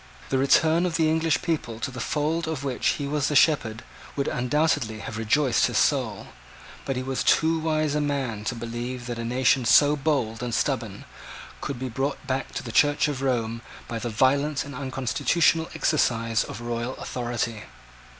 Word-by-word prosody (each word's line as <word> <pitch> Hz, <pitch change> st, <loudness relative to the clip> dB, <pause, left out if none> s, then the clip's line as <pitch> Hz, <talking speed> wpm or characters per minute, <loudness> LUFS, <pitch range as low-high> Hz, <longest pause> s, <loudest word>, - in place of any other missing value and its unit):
The 135 Hz, -, +1 dB
return 160 Hz, +5 st, +4 dB
of 170 Hz, -, -3 dB
the 160 Hz, -1 st, +3 dB
English 160 Hz, 0 st, +1 dB
people 155 Hz, -10 st, -2 dB
to 130 Hz, -, -3 dB
the 125 Hz, -, -8 dB
fold 155 Hz, +6 st, -1 dB
of 160 Hz, -4 st, -3 dB
which 135 Hz, -3 st, -1 dB
he 145 Hz, -, -3 dB
was 145 Hz, 0 st, 0 dB
the 150 Hz, -, -1 dB
shepherd 120 Hz, -7 st, +3 dB, 0.3 s
would 140 Hz, -, -1 dB
undoubtedly 125 Hz, -3 st, 0 dB
have 110 Hz, -, -6 dB
rejoiced 120 Hz, +3 st, +2 dB
his -, -, -2 dB
soul. -, -, +1 dB, 0.6 s
But 135 Hz, -, -2 dB
he 125 Hz, -, -2 dB
was 135 Hz, 0 st, -2 dB
too 165 Hz, 0 st, +3 dB
wise 155 Hz, -2 st, 0 dB
a 150 Hz, -, +1 dB
man 135 Hz, -7 st, -2 dB
to 125 Hz, -, -2 dB
believe 120 Hz, +2 st, -5 dB
that 120 Hz, -1 st, -5 dB
a -, -, -3 dB
nation 130 Hz, +2 st, +2 dB
so 145 Hz, +5 st, +5 dB
bold 135 Hz, -7 st, -1 dB
and 120 Hz, -2 st, -2 dB
stubborn, -, -, -2 dB, 0.6 s
could 140 Hz, -, -4 dB
be 130 Hz, +1 st, -4 dB
brought 135 Hz, +4 st, -3 dB
back 135 Hz, 0 st, -2 dB
to -, -, -3 dB
the 120 Hz, -, -6 dB
Church 145 Hz, +5 st, +3 dB
of 140 Hz, -3 st, -3 dB
Rome 115 Hz, -4 st, -1 dB, 0.3 s
by 115 Hz, -, -4 dB
the 120 Hz, +2 st, -3 dB
violent 140 Hz, +6 st, +1 dB
and 140 Hz, -, -8 dB
unconstitutional 140 Hz, +5 st, +1 dB
exercise 115 Hz, -7 st, +1 dB
of 110 Hz, -, -8 dB
royal 120 Hz, +2 st, -3 dB
authority. 120 Hz, -3 st, -3 dB
130 Hz, 180 wpm, -25 LUFS, 120-150 Hz, 0.6 s, so